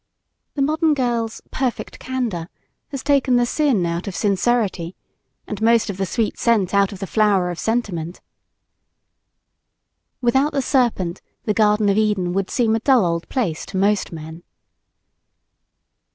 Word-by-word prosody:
The 280 - +1
modern 310 +1 +2
girl's 235 -4 -2
"perfect 260 -3 -3
candor" 230 -10 -3 0.4
has 275 -2 -6
taken 275 -3 +3
the 245 0 +3
sin 250 - +1
out 170 +2 -3
of 195 - -5
sincerity 200 -4 0 0.5
and 210 0 -6
most 225 -1 +3
of 190 - -9
the 195 -1 -1
sweet 225 +3 -1
scent 215 -6 +2
out 200 0 +3
of 200 - -7
the 195 - -5
flower 195 -3 +2
of 175 - -7
sentiment. 190 -8 -2 2.0
Without 265 +5 +2
the 280 - +1
Serpent, 230 - 0 0.2
the 210 - 0
Garden 210 -1 +3
of 200 0 +2
Eden 200 -5 0
would 195 0 -1
seem 230 -4 +1
a - - 0
dull 250 -3 +4
old 170 0 -2
place 190 -12 -1
to - - -5
most 200 +1 +1
men. 160 0 -8
215 Hz, 150 wpm, -21 LUFS, 185-245 Hz, 2.0 s, dull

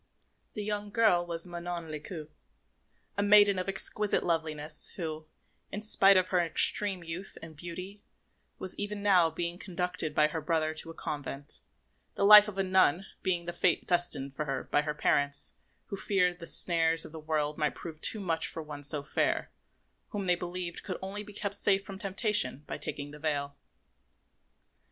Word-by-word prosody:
The 210 - -4
young 205 0 -3
girl 205 -5 +3
was 170 0 -1
Manon 175 -1 -6
Lescaut, 155 +1 -7 0.9
a - - +2
maiden 205 -1 +6
of 185 - -3
exquisite 205 +2 +1
loveliness, 155 -2 -2
who, 155 -3 -5 0.4
in 205 - -4
spite 195 -2 +5
of 185 0 +2
her 180 - +2
extreme 180 +2 +1
youth 170 +4 -6
and 160 -1 -10
beauty, 180 +5 -8 0.6
was 185 - -3
even 205 0 -3
now 185 -5 +5
being 170 +2 -3
conducted 180 -5 -3
by 150 0 +4
her 160 +1 -4
brother 155 0 0
to 160 +1 -4
a 165 - -9
convent, 145 -1 -6 0.6
the 200 - +1
life 210 0 +10
of 205 -2 -7
a 195 - +2
nun 185 -1 +3 0.2
being 175 -3 0
the 175 - -4
fate 175 -1 +1
destined 170 -6 0
for 150 - -3
her 135 -2 -3
by 145 - +1
her 150 0 -3
parents, 145 -1 +1 0.3
who - - -3
feared 185 -2 +1
that 175 - -23
the 170 - -8
snares 165 -2 +4
of - - -9
the 160 - -8
world 150 -1 -2
might 150 -1 0
prove 160 -2 -9
too 220 - 0
much 165 -4 -1
for 160 - -6
one 150 -1 -8
so 145 0 +1
fair, 140 - -1 0.6
whom 205 -4 -4
they 180 - +4
believed 175 0 -4
could 185 - -5
only 195 +2 -5
be 210 0 -10
kept 200 0 -3
safe 200 -1 +2
from 195 -1 -8
temptation 200 - +1
by - - -5
taking 145 0 -5
the 150 - -11
veil. 145 -2 -2
175 Hz, 180 wpm, -30 LUFS, 155-195 Hz, 0.9 s, life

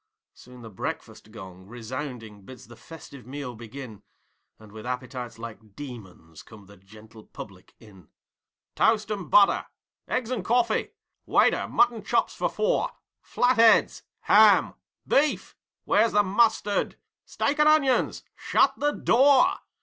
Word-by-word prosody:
Soon 125 -1 -15
the 115 - -10
breakfast 100 +2 -7
gong 95 -4 -12
resounding 120 -2 -8
bids 125 +4 -13
the 120 +2 -15
festive 140 -5 -13
meal 135 -2 -7
begin, 115 -1 -11 0.6
And, 110 -1 -17
with 110 0 -11
appetites 125 -1 -6
like 110 -3 -11
demons, 95 - -11
come 105 -3 -16
the 100 +1 -17
gentle 110 +3 -17
public 95 -3 -13
in. 100 -6 -18 0.6
'Toast 215 -1 +1
and 195 -6 -5
butter!' 200 -1 +4 0.4
'Eggs 250 -1 -3
and 235 -7 -3
coffee!' 240 +4 0 0.3
'Waiter, - - +2
mutton 240 -2 +1
cops - - -1
for - - -2
four!' 485 +3 -1 0.3
'Flatheads!' 230 -2 +3 0.2
'Ham!' - - +4 0.3
'Beef!' 295 +2 0 0.3
'Where's 230 - +2
the 205 0 +4
mustard?' 205 0 0 0.3
'Steak 290 +2 -2
and 300 0 +5
onions!' 275 -4 +1
'Shut 270 - +1
the 295 +1 0
door!' 265 +2 +4
125 Hz, 130 wpm, -25 LUFS, -, 0.6 s, and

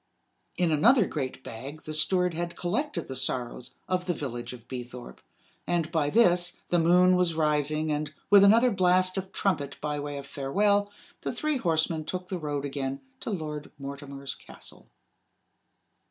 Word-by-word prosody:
In 175 -2 +2
another 220 - +5
great 130 -5 -4
bag 135 +7 -8
the 155 - -6
steward 180 +3 +2
had 170 +1 -4
collected 245 +13 -2
the 130 - -6
sorrows 125 -1 -3
of 180 0 -1
the 175 - 0
Village 120 -5 -5
of 120 -2 -12
Beethorpe; 125 -1 -8 0.5
and, 170 -2 0
by 155 -4 +1
this, 180 -4 +4
the 175 - +3
moon 180 +2 +5
was 180 -2 +2
rising, 155 0 +1
and, 150 0 -2 0.2
with 200 -1 +9
another 230 +5 +6
blast 185 -1 +3
of 190 0 -8
trumpet 145 -8 -1
by 150 -1 -2
way 145 0 -4
of 140 - -7
farewell, 200 +10 +1 0.3
the - - -2
three 305 -2 -1
horsemen 160 -5 +1
took 180 +3 -5
the 185 - -3
road 145 -2 -3
again 135 -1 -3 0.2
to - - -5
Lord 155 -6 -4
Mortimer's 140 0 -6
castle. - - -11
160 Hz, 160 wpm, -28 LUFS, 140-185 Hz, 0.5 s, with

